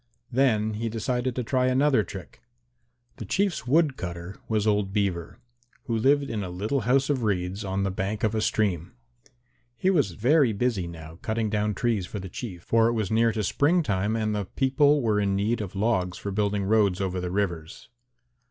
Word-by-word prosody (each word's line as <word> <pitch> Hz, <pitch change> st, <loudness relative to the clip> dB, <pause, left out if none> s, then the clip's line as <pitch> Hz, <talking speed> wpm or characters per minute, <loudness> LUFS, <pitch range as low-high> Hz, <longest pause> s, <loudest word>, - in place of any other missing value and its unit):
Then 115 Hz, -4 st, +2 dB
he 115 Hz, +2 st, -3 dB
decided 125 Hz, +3 st, -2 dB
to 125 Hz, -, -2 dB
try 130 Hz, +2 st, +1 dB
another 130 Hz, -1 st, +3 dB
trick. 95 Hz, 0 st, -10 dB, 0.8 s
The -, -, -6 dB
Chief's 195 Hz, -8 st, -1 dB
wood 150 Hz, 0 st, +3 dB
cutter 85 Hz, +1 st, -6 dB
was 110 Hz, -2 st, +1 dB
old 105 Hz, -2 st, +1 dB
Beaver, 95 Hz, -5 st, -2 dB, 0.5 s
who 115 Hz, -, -2 dB
lived 140 Hz, +6 st, +3 dB
in 105 Hz, -3 st, -2 dB
a 90 Hz, -, -5 dB
little 105 Hz, +10 st, -1 dB
house 135 Hz, +1 st, +3 dB
of 135 Hz, -3 st, 0 dB
reeds 95 Hz, -1 st, -1 dB
on 95 Hz, 0 st, -2 dB
the 95 Hz, -, 0 dB
bank 95 Hz, +3 st, -3 dB
of 110 Hz, 0 st, +2 dB
a 110 Hz, -, 0 dB
stream. 95 Hz, -6 st, 0 dB, 0.8 s
He 185 Hz, +9 st, +2 dB
was 140 Hz, -, +1 dB
very 125 Hz, -, +3 dB
busy 100 Hz, -4 st, -1 dB
now 80 Hz, -1 st, -10 dB
cutting 110 Hz, -1 st, -1 dB
down 105 Hz, -1 st, 0 dB
trees 110 Hz, -4 st, 0 dB
for -, -, -6 dB
the 95 Hz, 0 st, -7 dB
Chief, 90 Hz, -3 st, -7 dB
for 115 Hz, 0 st, +3 dB
it 120 Hz, -, +1 dB
was 110 Hz, -4 st, -2 dB
near 115 Hz, +1 st, +3 dB
to 110 Hz, -1 st, -2 dB
spring 160 Hz, -, +2 dB
time 100 Hz, -1 st, 0 dB
and 110 Hz, -1 st, -1 dB
the 105 Hz, -1 st, -2 dB
people 140 Hz, +5 st, +2 dB
were 105 Hz, -2 st, +2 dB
in 100 Hz, -1 st, +1 dB
need 110 Hz, +4 st, 0 dB
of 100 Hz, -2 st, -6 dB
logs 95 Hz, -4 st, 0 dB
for 100 Hz, -, -5 dB
building 100 Hz, 0 st, 0 dB
roads 100 Hz, -2 st, +2 dB
over 95 Hz, -2 st, -2 dB
the 90 Hz, -, -3 dB
rivers. 85 Hz, -5 st, -3 dB
105 Hz, 195 wpm, -26 LUFS, 95-120 Hz, 0.8 s, another